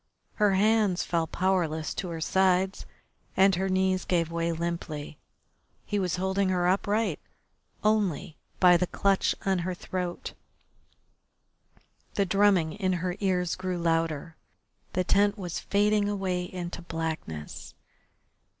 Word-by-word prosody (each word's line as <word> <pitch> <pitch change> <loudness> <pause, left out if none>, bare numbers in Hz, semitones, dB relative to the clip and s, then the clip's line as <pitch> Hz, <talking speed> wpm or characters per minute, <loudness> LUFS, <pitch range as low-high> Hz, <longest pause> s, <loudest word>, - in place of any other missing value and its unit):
Her 205 -2 +5
hands 210 -2 +3
fell 165 -2 0
powerless 170 -5 0
to 185 - -4
her 165 -1 -5
sides 190 +2 +1 0.5
and 195 +1 +6
her 190 +2 0
knees 185 0 +1
gave 170 -2 0
way 170 0 -1
limply. 165 -3 -4 0.7
He 205 - -1
was 180 -3 0
holding 190 +1 0
her 180 -1 +1
upright 205 +4 +1 0.6
only 205 -8 +1 0.2
by 180 -1 +7
the 180 +1 0
clutch 195 +1 +1
on 190 -2 +2
her 180 +1 -3
throat. 180 -1 -4 1.8
The 200 - +2
drumming 195 -4 +3
in 190 -2 0
her 180 0 -2
ears 180 -3 0
grew 185 -1 -3
louder, 165 -2 -1 0.6
the 185 - +1
tent 205 +3 +3
was 180 -4 -4
fading 205 0 +2
away 185 -3 -1
into 175 -1 -6
blackness. 160 - -5
185 Hz, 125 wpm, -28 LUFS, 170-195 Hz, 1.8 s, by